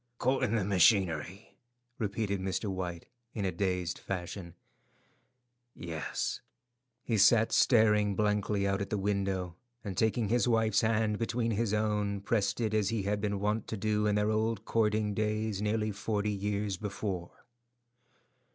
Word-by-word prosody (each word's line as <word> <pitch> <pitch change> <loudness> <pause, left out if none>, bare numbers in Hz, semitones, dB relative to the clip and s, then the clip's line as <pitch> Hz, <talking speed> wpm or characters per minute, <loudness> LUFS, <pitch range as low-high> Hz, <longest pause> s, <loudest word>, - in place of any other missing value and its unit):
"Caught 130 +2 +1
in 115 -1 0
the 110 - +1
machinery," 95 -1 +2 0.4
repeated 100 -1 -1
Mr. 95 +1 -2
White, 90 -3 -4 0.3
in 105 -3 -2
a 95 - 0
dazed 90 -1 -2
fashion, 90 -1 -5 1.2
"yes." 80 -2 -4 0.6
He 115 -3 0
sat 110 +3 +5
staring 105 -4 +4
blankly 105 -1 +1
out 100 +1 0
at 100 - -3
the 105 - -1
window, 95 -3 -1 0.3
and 100 -3 -5
taking 110 +1 +1
his 120 +2 +2
wife's 115 -3 +3
hand 110 -1 +1
between 115 0 -1
his 110 0 0
own, 105 -2 0
pressed 105 +1 0
it 110 -2 0
as 105 -2 +2
he 115 -3 -1
had 100 +1 -1
been 100 -1 -1
wont 105 +2 -1
to 110 - -4
do 105 +1 0
in 105 - +2
their 105 +1 +1
old 110 -1 -1
courting 105 -2 +1
days 110 -1 -1
nearly 105 0 0
forty 105 +1 -2
years 100 -1 -2
before. 95 -4 -5
105 Hz, 150 wpm, -31 LUFS, 95-110 Hz, 1.2 s, sat